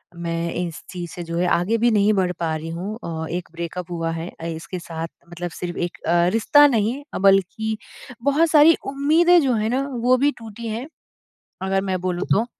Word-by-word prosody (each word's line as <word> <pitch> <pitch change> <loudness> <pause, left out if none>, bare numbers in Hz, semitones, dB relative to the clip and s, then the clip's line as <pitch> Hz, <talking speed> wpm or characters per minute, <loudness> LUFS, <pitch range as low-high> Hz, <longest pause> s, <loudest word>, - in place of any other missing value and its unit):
मैं 170 0 -3
इस 170 -3 -4
चीज़ 175 -3 -6
से 175 - -6
जो 170 0 -4
है 180 +1 +1
आगे 185 +7 +2
भी 235 +1 +3
नहीं 210 0 +4
बढ़ 185 -2 +1
पा 160 -2 -1
रही 160 +1 -5
हूँ। 185 +6 -4
अ, 160 -1 -4
एक 175 0 -4
ब्रेकअप 170 +1 -6
हुआ 165 -1 -2
है 165 +2 -5 0.2
इसके 165 +3 -6
साथ 165 -1 -5 0.2
मतलब 175 0 -5
सिर्फ़ 175 -1 -4
अ, - - -2
एक 175 - -3 0.4
रिश्ता 290 +6 +6
नहीं 240 +3 0 0.2
बल्कि 195 +3 +2 0.5
बहुत 300 +4 +3
सारी 310 +1 +7 0.2
उम्मीदें 325 +6 +5
जो 265 -4 +2
हैं 215 0 0
न 270 +2 0 0.2
वो 255 +1 +5
भी 290 - +4
टूटी 225 0 -8
हैं। 230 +5 -4 0.8
अगर 190 0 +1
मैं 185 -1 -1
बोलूँ 180 0 -2
तो 220 +3 +2
190 Hz, 195 wpm, -22 LUFS, 170-235 Hz, 0.8 s, सारी